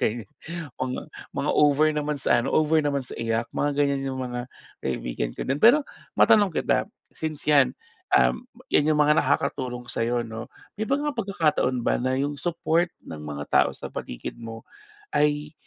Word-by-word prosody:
okey. 115 +1 0 0.6
Mga 130 0 -2 0.3
mga - - -1
over 150 +1 +5
naman 150 0 -1
sa - - +3
ano, 135 - -2
over 155 0 +4
naman 145 -1 +1
sa 125 - -9
iyak, 115 0 -1
mga 145 - +1
ganyan 140 -1 +1
yung 130 - -4
mga 125 -1 -4 0.4
kaibigan - - -2
ko - - -7
din. 135 - +1
Pero 265 +7 +8 0.4
matanong 205 -3 +6
kita, - - +1 0.3
since, 155 -2 -5
'yan, 140 -3 +5 0.4
um, 315 - +4 0.3
'yan 150 +1 +3
yung 150 - 0
mga 150 0 +5
nakakatulong 125 -2 -1
sa'yo, 120 +1 0
'no, 110 0 -6 0.3
may 215 - -1
mga 285 +4 0
pagkakataon 160 - +1
ba - - +1
na 130 +1 0
yung 145 +1 -1
support 170 +2 0 0.2
ng 75 -1 -7
mga 75 -1 -5
tao - - +4
sa - - -7
paligid - - -6
mo 115 -1 -8 0.5
ay 150 0 +1
140 Hz, 170 wpm, -25 LUFS, 120-155 Hz, 0.6 s, Pero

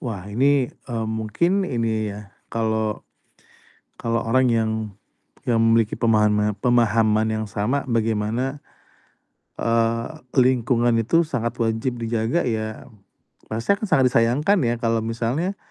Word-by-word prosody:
Wah 105 -7 -5
ini, 135 +3 +2 0.2
mmm, 115 -2 -2
mungkin 170 - 0
ini 110 -3 -1
ya 105 -1 -11 0.2
kalau, 110 -1 -1 0.9
kalau 115 0 -1
orang 130 +3 +2
yang 110 -1 +1 0.8
yang 115 -2 +2
memiliki 115 -1 +3
pemahana 105 -2 +2
pemahaman 110 -2 +2
yang 110 0 -2
sama 110 +8 -1
bagaimana, 115 +4 -1 1.0
eee, 115 0 +1 0.3
lingkungan 120 -2 +3
itu 165 +10 +3
sangat 125 -6 -3
wajib 115 +2 -1
dijaga 115 +7 0
ya, 110 0 -4 0.6
rasanya 115 - +1
akan - - -1
sangat 130 -1 +4
disayangkan 135 - +3
ya 120 - +1
kalau 115 -1 +1
misalnya 125 - -2
115 Hz, 120 wpm, -22 LUFS, 110-125 Hz, 1.0 s, sangat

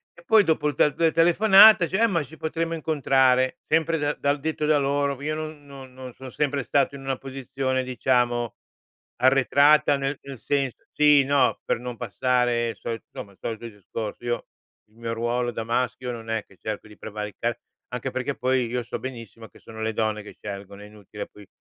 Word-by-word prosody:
e 170 - -17
poi 220 +2 +6
dopo 160 -4 +1
il 145 - -1
te 150 +1 +3
2 165 +1 +2
telefonate, 195 +3 +7
dice: 190 +4 -1
"Eh - - +6
ma 170 -6 0
ci 150 +4 -13
potremmo 165 +1 -2
incontrare," 135 -5 +2
sempre 165 +1 +1
dal 145 -1 -2
da 140 0 +2
detto 155 +1 -3
da 150 -1 +4
loro, 140 -1 0
io 155 +1 -2
non 155 -1 -7
non 135 -2 -12
non 130 -1 -9
sono 130 0 -10
sempre 140 0 -1
stato 140 +1 +1
in 135 - -9
una 135 -1 -2
posizione, 130 -1 -3
diciamo, 120 -2 0 0.7
arretrata, 140 +2 +5
nel 135 0 -3
nel 135 -2 -8
senso, 135 -1 -2
sì, 150 -2 +5
no, 135 -2 +2
per - - 0
non 125 -1 -6
passare 120 +1 0
il - - -6
solito 115 -1 -5
insomma 100 - -8
il - - -27
solito 115 +1 -5
discorso. 105 +2 -7
Io, 120 0 -2 0.4
il 110 - -27
mio 115 0 -4
ruolo 120 +1 -1
da 115 - -4
maschio, 125 +2 -1
non 115 -1 -8
è 115 -2 -1
che 95 - -22
cerco 110 0 -5
di 105 - -15
prevaricare, 110 +2 -4 0.3
anche 125 +2 -4
perché 130 +2 -2
poi, 130 -1 +1
io 125 +1 -2
so 120 - -5
benissimo 115 -3 -8
che - - -19
sono 110 0 -10
le 110 0 -1
donne 110 -1 -1
che - - -11
scelgono, 100 0 -8
è - - -10
inutile, 105 0 -9
poi 105 -2 -16
130 Hz, 200 wpm, -25 LUFS, 115-145 Hz, 0.7 s, telefonate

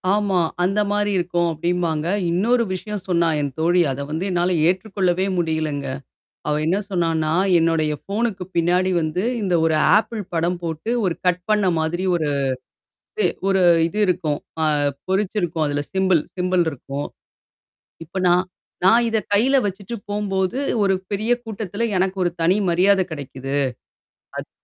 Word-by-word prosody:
ஆமா. 200 -4 +1 0.2
அந்த 195 +3 +1
மாரி 205 0 +1
இருக்கும் 175 -1 0
அப்டிம்பாங்க. 165 -1 -1 0.2
இன்னொரு 235 +7 +2
விஷயம் 205 +2 -5
சொன்னா 170 -2 +2
என் 140 -1 -2
தோழி. 175 +2 +3
அத 135 +1 -4
வந்து 160 +5 -2
என்னால 175 0 +1 0.2
ஏற்றுக்கொள்ளவே 185 0 0
முடியலங்க. 155 -4 -1 0.6
அவ 150 0 +1
என்ன 180 +5 +2
சொன்னான்னா, 165 -4 0 0.3
என்னுடைய 165 -2 +1
ஃபோனுக்கு 205 -1 -2
பின்னாடி 180 +2 +2
வந்து 160 +3 -1 0.2
இந்த 185 -3 0
ஒரு 160 -1 +2 0.2
ஆப்பிள் 225 +1 0
படம் 175 +2 0
போட்டு 165 +5 -4
ஒரு 180 -3 +1
கட் 180 0 +2
பண்ண 210 -2 +3
மாதிரி 165 +3 -1
ஒரு 160 -3 0 0.9
இது 430 - +2 0.2
ஒரு 195 -1 +3 0.3
இது 195 - -7
இருக்கும். 170 -5 0 0.3
அ - - +3 0.4
பொறிச்சுிருக்கும். 190 -4 0
அதுல 145 0 -1
சிம்பள் 190 -4 +3 0.2
சிம்பள் 180 -1 +2
இருக்கும். 140 0 -6 1.0
இப்ப 190 +4 -5
நான் 180 +1 +4 0.4
நான் 230 +5 +6
இத 225 - +1 0.2
கையில 255 +7 +4
வச்சுட்டு 200 +4 -4
போம்போது, 195 0 -1 0.3
ஒரு 195 -1 +3 0.2
பெரிய 215 +4 -1
கூட்டத்துல 215 -1 -4
எனக்கு 190 +1 0
ஒரு 175 - +1
தனி 170 +3 +4
மரியாதை 190 +3 +4
கிடைக்குது. 135 -2 -5 0.8
அத் - - -6
180 Hz, 140 wpm, -21 LUFS, 165-195 Hz, 1.0 s, நான்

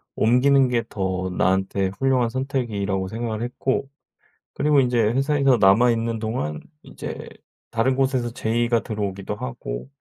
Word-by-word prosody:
옮기는 130 +4 +4
게 120 -2 0
더 95 -3 -2
나한테 95 +1 +1
훌륭한 130 -3 +2
선택이라고 115 -7 -2
생각을 110 +1 -4
했고 130 +3 -2 0.7
그리고 150 0 +3
인제 125 -2 +2
회사에서 135 +4 +3
남아 110 +5 +5
있는 115 0 -1
동안 110 -10 -3 0.2
이제 - - -8 0.4
다른 120 +3 +1
곳에서 130 -3 0
제의가 120 -1 0
들어오기도 100 -2 -4
하고 65 -5 -6
115 Hz, 320 characters per minute, -23 LUFS, 100-130 Hz, 0.7 s, 남아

